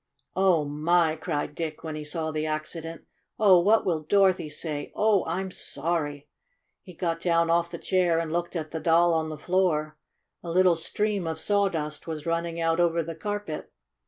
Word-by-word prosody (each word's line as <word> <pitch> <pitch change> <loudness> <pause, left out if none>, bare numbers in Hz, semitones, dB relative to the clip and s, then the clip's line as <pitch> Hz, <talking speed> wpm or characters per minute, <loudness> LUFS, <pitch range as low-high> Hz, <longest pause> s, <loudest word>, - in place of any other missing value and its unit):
"Oh, 185 -5 +3
my!" 155 +2 +2
cried 155 -2 -3
Dick, 155 -1 -5
when 160 -1 -5
he 155 - -5
saw 160 +1 -3
the 155 0 -2
accident. 155 +1 -5 0.3
"Oh, 195 -4 +6
what 210 +6 +3
will 165 -4 0
Dorothy 190 -1 +2
say? 150 -1 -4
Oh, 210 -2 +3
I'm 185 +3 -2
sorry!" 150 -5 -2 0.5
He 180 -3 -13
got 165 -1 -2
down 170 -1 +2
off 170 0 +2
the 170 - -6
chair 180 -2 +1
and 165 -1 -2
looked 175 +2 -2
at 155 -2 -4
the 160 - -3
Doll 170 +1 +4
on 160 -1 0
the 155 - -6
floor. 155 -3 0 0.4
A 170 - -7
little 180 0 +4
stream 200 +3 -1
of 160 -1 -3
sawdust 170 -7 -1
was 155 -2 -5
running 170 0 -2
out 165 0 +1
over 170 -1 +2
the 165 +1 -6
carpet. 205 -1 -5
165 Hz, 180 wpm, -26 LUFS, 155-180 Hz, 0.5 s, Oh